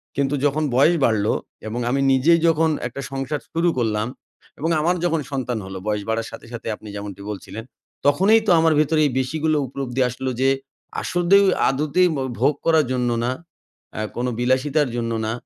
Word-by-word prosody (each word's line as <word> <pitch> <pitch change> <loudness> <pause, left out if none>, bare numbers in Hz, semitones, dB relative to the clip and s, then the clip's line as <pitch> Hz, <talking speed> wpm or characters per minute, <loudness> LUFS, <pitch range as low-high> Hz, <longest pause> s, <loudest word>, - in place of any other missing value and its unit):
কিন্তু 140 0 0
যখন 150 +2 +1
বয়স 155 +7 +5
বাড়লো 110 -2 +2 0.3
এবং 115 +3 -3
আমি 135 +2 +1
নিজেই 160 +6 +4
যখন 160 0 +3 0.2
একটা 130 +3 -7
সংসার 135 +2 -3
শুরু 170 +1 +2
করলাম। 110 -2 0 0.5
এবং 160 +3 -1
আমার 175 +3 +2
যখন 165 -2 +1
সন্তান 125 -3 -2
হলো 95 0 -7
বয়স 105 -1 -1
বাড়ার 115 0 -1
সাথে, - - -10
সাথে 115 - -7
আপনি 105 - -14
যেমনটি 100 -1 -7
বলছিলেন। 105 +3 -7 0.4
তখনই 195 +10 +5
তো - - +5
আমার 160 -1 +4
ভেতরে 155 +1 +2 0.2
বেশি 130 +5 -2
গুলো 155 -1 +2
উপলব্ধি 130 -1 -3
আসলো 130 +2 -4
যে 135 - +4 0.5
আসলে 175 +2 +3 0.3
আদতেই 155 +6 +2 0.3
ভোগ 140 +5 +3
করার 160 -3 +4
জন্য 125 -1 0
না 125 - 0 0.7
আ - - -2
কোন 120 - -2
বিলাসিতার 130 +3 +1
জন্য 115 -1 -2
না। 110 - -1
135 Hz, 170 wpm, -22 LUFS, 120-160 Hz, 0.7 s, বয়স